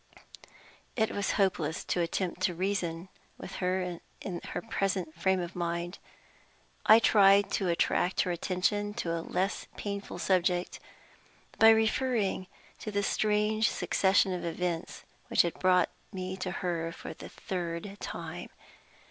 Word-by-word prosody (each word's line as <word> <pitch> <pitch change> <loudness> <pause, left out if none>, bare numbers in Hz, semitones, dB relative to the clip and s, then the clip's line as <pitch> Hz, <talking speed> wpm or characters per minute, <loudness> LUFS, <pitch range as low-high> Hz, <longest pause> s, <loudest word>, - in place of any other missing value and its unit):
It 220 -2 +1
was 200 -1 -1
hopeless 180 -5 0
to 175 - 0
attempt 175 +1 -2
to 180 -1 +1
reason 180 -2 -2 0.3
with - - -8
her 180 -1 -1 0.2
in 180 -3 -5
her - - -4
present 195 -7 -1
frame 190 +3 +1
of 175 0 -5
mind. 170 +1 -3 0.9
I 220 - +10
tried 200 -3 +5
to 195 - 0
attract 175 +2 +2
her 180 - 0
attention 200 +4 -1
to 165 - -2
a 165 - -2
less 185 +4 -2
painful 200 -1 -5
subject 180 -1 +1 0.8
by 225 - +9
referring 220 -3 +2 0.3
to - - -5
the 205 -1 0
strange 215 +1 +2
succession 190 -1 +2
of 180 - -4
events 170 0 -3 0.2
which - - +4
had 170 - -3
brought 180 -1 +4 0.2
me 185 -1 -4
to 185 -1 -3
her 170 -2 -2
for - - -8
the - - -10
third 180 +2 -5
time. - - -6
185 Hz, 140 wpm, -30 LUFS, 175-200 Hz, 0.9 s, I